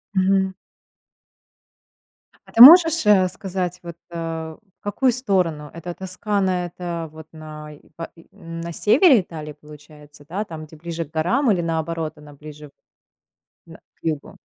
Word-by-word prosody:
Мгм. 190 0 +2 1.9
А - - -16
ты 230 - +4
можешь, 325 0 +9
э, 195 -3 +5
сказать, 180 -1 -5
вот, 170 -1 -8
э, 170 - -8 0.6
в - - -66
какую 245 +5 +1
сторону? 180 - -1
Эта 170 +1 -7
Тоскана, 190 -1 -2
это 170 -1 -6
вот 160 0 -13
най 150 -1 -11
па 165 - -7
и 165 - -19
на 165 -3 -8
севере 245 - +4
Италии, 155 -4 -9
получается? 150 -1 -16
Да, 195 +5 -3
там, 160 -6 -9
где 155 - -16
ближе 165 +1 -6
к 150 - -24
горам 185 - +1
или 180 -3 +1
наоборот, 160 -1 -3
она 150 -1 -14
ближе 150 +1 -12 1.0
на - - -13 0.2
к - - -43
югу? 155 -3 -4
170 Hz, 145 wpm, -21 LUFS, 155-190 Hz, 1.9 s, можешь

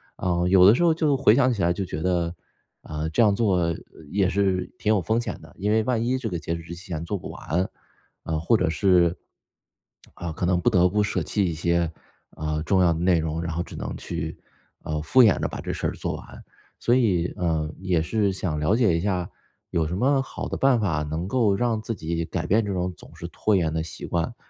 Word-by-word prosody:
啊， 90 -1 0
有 90 0 +6
的 100 - +8
时 150 - +1
候 170 -2 +5
就 155 -4 +1
回 120 -5 +5
想 130 -1 +4
起 105 - -3
来 85 -1 +3
就 95 - -3
觉 85 -4 -5
得， 85 -1 0 0.5
啊， 75 +1 -4
这 80 - +1
样 105 -3 +4
做 90 -7 +1 0.3
也 95 +1 +1
是 95 -2 0
挺 105 - +1
有 105 - +2
风 110 +6 +1
险 110 -6 -5
的， 80 -1 -15
因 100 +2 -1
为 110 0 +3
万 120 -1 0
一 130 +2 +1
这 125 -4 -3
个 85 -3 -3
截 85 +1 -3
止 85 - -7
日 85 - -15
期 85 +3 -10
前 85 -3 -4
做 100 +4 -2
不 - - -8
完。 90 +5 -2 0.5
呃， 80 -1 -2
或 85 +9 +2
者 105 - +1
是， 85 +1 +3 1.0
啊， 85 -1 -5
可 85 +3 -3
能 90 0 +2
不 120 - +3
得 90 -5 +4
不 105 +3 +1
舍 105 - 0
弃 105 - 0
一 - - -3
些， 85 +1 0 0.4
啊， 75 0 -3
重 95 +4 +2
要 85 -1 +4
的 80 - -4
内 90 0 +3
容， 80 0 -2
然 85 - -3
后 85 +2 -2
只 - - -11
能 - - -5
去， 80 -2 -5 0.5
呃， 75 0 -3
敷 125 +12 +5
衍 110 - +4
着 - - 0
把 - - -7
这 - - -4
事 - - -2
儿 - - -1
做 - - -3
完。 - - -11 0.3
所 120 - +1
以， 95 -9 +2
呃， 80 -4 -1
也 95 -3 +1
是 100 +5 +1
想 90 -5 -2
了 75 +8 +2
解 110 -8 +3
一 85 - 0
下， 90 -2 -1 0.4
有 80 -2 +1
什 90 +3 -3
么 135 +5 +3
好 130 - -6
的 - - -4
办 135 -3 +3
法 85 -8 0
能 80 +4 -3
够 110 -4 +2
让 115 0 0
自 115 +1 -4
己 85 -2 -3
改 85 +1 -3
变 105 +5 +3
这 100 - -3
种 90 -1 -2
总 - - -15
是 - - -7
拖 110 - 0
延 80 -4 +1
的 80 - 0
习 80 0 -7
惯？ 85 +6 -2
90 Hz, 260 characters per minute, -25 LUFS, 85-105 Hz, 1.0 s, 的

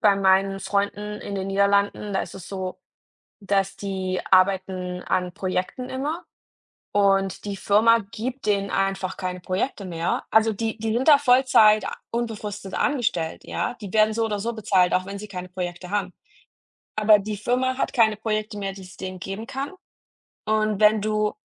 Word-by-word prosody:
bei 205 -3 +5
meinen 195 0 +3
Freunden 205 +2 -2
in 200 - -6
den 190 0 -3
Niederlanden, 200 +1 +1
da 190 - +1
ist - - -9
es 190 -2 -9
so, 190 -2 -5 0.6
dass 195 0 0
die 190 -2 -3
arbeiten 185 -1 +2
an 180 -1 -1
Projekten 185 +8 -3
immer, 295 +6 -3 0.7
und 195 -1 +2
die 200 -1 -3
Firma 225 +4 +4
gibt 245 +2 -5
denen 200 -1 +1
einfach 195 -1 -1
keine 180 -1 -4
Projekte 190 +4 -2
mehr. 170 0 -2
Also 220 0 +4
die 220 +2 -3
die 220 0 -1
sind 255 +6 0
da 290 - +10
Vollzeit 245 -6 +5
a - - -3 0.2
unbefristet 210 -4 -4
angestellt, 235 - -1
ja, 245 - -2
die 200 -3 -7
werden 215 0 +4
so 225 0 +1
oder 210 -2 -2
so 235 +3 -2
bezahlt, 195 -5 +2
auch 185 +1 +1
wenn 200 0 -6
sie 210 +1 -8
keine 180 -2 -6
Projekte 180 0 -5
haben. 195 -3 -1 0.8
Aber 215 0 +6
die 210 +1 -4
Firma 255 +4 0
hat - - -1
keine 220 -3 +4
Projekte 215 -1 -2
mehr, 195 -1 -3
die 190 0 -11
es 185 0 -13
denen 185 -1 -6
geben 195 +5 -5
kann. 275 +5 -4 0.7
Und 215 -1 +1
wenn 215 0 +5
du 215 0 0
200 Hz, 175 wpm, -24 LUFS, 190-220 Hz, 0.8 s, da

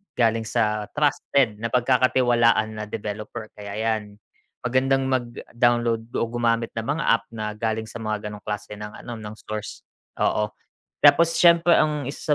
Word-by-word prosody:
galing 115 -2 +1
sa 105 -3 0
trusted 140 -6 +1
napagkakatiwalaan 120 -2 +3
na - - -3
developer 105 +1 -6
kaya 100 -1 -8
'yan 110 -2 -2 0.5
magandang 135 +2 +2
mag-download 120 -2 0
o - - +1
gumamit 115 -1 0
ng 115 +1 -5
mga 150 +3 -1
app 115 - +2
na 105 -1 -3
galing 110 +1 -2
sa 110 +2 -9
mga 110 -1 -3
ganong 105 - -8
klase 105 0 -5
ng 105 0 -7
ano, 120 - -5
ng 105 0 -8
stores, 110 -1 -7 0.3
oo. 105 0 +1 0.5
Tapos 170 0 +6
siyempre 170 0 +6
ang 150 -2 +1
isa 150 +1 -1
115 Hz, 145 wpm, -24 LUFS, 105-125 Hz, 0.5 s, Tapos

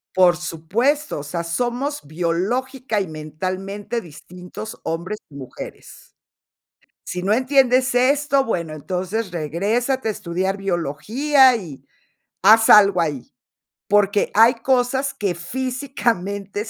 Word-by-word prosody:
Por 180 -2 +5
supuesto, 200 - -1
o - - -6
sea, 170 +3 -4
somos 245 - -2
biológica 210 - -2
y 195 - -2
mentalmente 185 +8 -5
distintos 180 +4 -10
hombres 180 +6 -4
y 140 - -13
mujeres. 130 -3 -11 0.9
Si 180 0 -5
no 205 +2 +2
entiendes 260 0 +3
esto, 275 +2 +3
bueno, 170 -7 -2
entonces 185 +6 -3
regrésate 210 - -1
a - - +1
estudiar 190 +1 -3
biología, 220 - +2
y 170 - -8 0.6
haz 220 +2 +6
algo 200 -3 +7
ahí. 150 -6 -2 0.6
Porque 205 0 +2
hay 225 +3 +6
cosas 260 +3 0
que 200 -4 -2
físicamente 210 - -3
200 Hz, 110 wpm, -21 LUFS, 175-250 Hz, 0.9 s, algo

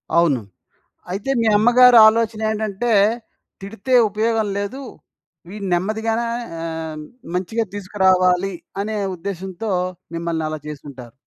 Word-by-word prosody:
అవును. 165 -7 +3 0.7
అయితే 200 +8 -2
మీ 225 - +1
అమ్మగారి 240 +2 +6
ఆలోచన 225 0 +1
ఏంటంటే 220 +2 -2 0.7
తిడితే 220 +5 -5 0.2
ఉపయోగం 220 +1 0
లేదు. 205 +7 -4 0.7
వీడి 200 0 -7
నెమ్మదిగానే 220 +5 -1 0.4
ఆహ్, 160 -2 -5 0.3
మంచిగా 220 +5 -1
తీసుకురావాలి 190 -1 +2 0.3
అనే 215 +1 -3 0.2
ఉద్దేశంతో 190 +3 -5 0.4
మిమ్మల్ని 165 -1 -2
అలా 155 -1 -5
చేసుంటారు. 140 -5 -9
200 Hz, 100 wpm, -20 LUFS, 170-220 Hz, 0.7 s, అమ్మగారి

